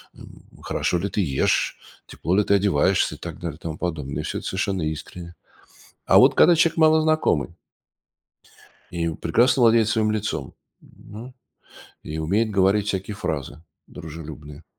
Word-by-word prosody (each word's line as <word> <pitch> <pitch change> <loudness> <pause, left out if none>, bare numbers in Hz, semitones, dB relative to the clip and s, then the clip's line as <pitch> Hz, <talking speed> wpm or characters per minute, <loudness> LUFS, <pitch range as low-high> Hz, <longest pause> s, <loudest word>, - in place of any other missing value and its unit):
м? - - -15 0.2
Хорошо 90 - -1
ли 100 +4 -3
ты 105 - -1
ешь, 70 -6 0 0.3
тепло 90 - -2
ли 105 - +4
ты 100 - +2
одеваешься 95 -7 +1
и - - -14
так - - -8
далее, 80 -4 -6
тому 80 -1 -6
подобное. 75 -6 -4
И - - -7
всё - - -4
это - - -7
совершенно 95 -1 -2
искренне. 85 +3 -6 0.7
А - - +5
вот - - +5
когда 175 - +6
человек 165 0 +2
малознакомый 155 - +2 1.4
и 85 -1 -2
прекрасно 120 - +2
владеет 115 -1 +4
своим 110 -1 +1
лицом, 110 0 -3 0.3
м, 115 +5 -13 0.7
и 75 +1 -6
умеет 100 +8 0
говорить 100 +1 +2
всякие 95 +1 -3
фразы 75 -4 -5 0.2
дружелюбные, 75 -1 -10
95 Hz, 145 wpm, -23 LUFS, 80-110 Hz, 1.4 s, когда